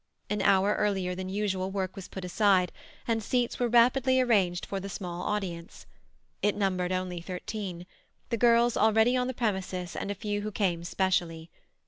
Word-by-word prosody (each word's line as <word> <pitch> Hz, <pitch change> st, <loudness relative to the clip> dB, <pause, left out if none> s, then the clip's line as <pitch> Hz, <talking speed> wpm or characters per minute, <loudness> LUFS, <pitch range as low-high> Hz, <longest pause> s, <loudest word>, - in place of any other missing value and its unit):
An 210 Hz, -1 st, 0 dB
hour 195 Hz, +1 st, +4 dB
earlier 190 Hz, -3 st, 0 dB
than 185 Hz, +1 st, -5 dB
usual 190 Hz, -1 st, -1 dB
work 190 Hz, -1 st, -3 dB
was 195 Hz, -3 st, -8 dB
put 190 Hz, -1 st, -7 dB
aside, 185 Hz, -1 st, +3 dB, 0.4 s
and 225 Hz, -1 st, +1 dB
seats 245 Hz, +2 st, -1 dB
were 245 Hz, -, +2 dB
rapidly 255 Hz, +2 st, +4 dB
arranged 195 Hz, -8 st, +2 dB
for 195 Hz, -, -4 dB
the 195 Hz, +1 st, -6 dB
small 175 Hz, -2 st, -5 dB
audience; 180 Hz, -5 st, -4 dB, 0.6 s
it 210 Hz, -, +2 dB
numbered 185 Hz, -3 st, 0 dB
only 185 Hz, -2 st, -2 dB
thirteen—the 185 Hz, +4 st, -7 dB
girls 235 Hz, +1 st, +4 dB
already 220 Hz, +3 st, +4 dB
on 250 Hz, 0 st, +1 dB
the 255 Hz, -, -4 dB
premises 190 Hz, -6 st, -2 dB
and -, -, -4 dB
a 205 Hz, -, -2 dB
few 205 Hz, 0 st, -3 dB
who 215 Hz, +1 st, -4 dB
came 180 Hz, -5 st, 0 dB
specially. 170 Hz, -3 st, -1 dB
195 Hz, 165 wpm, -28 LUFS, 180-220 Hz, 0.6 s, hour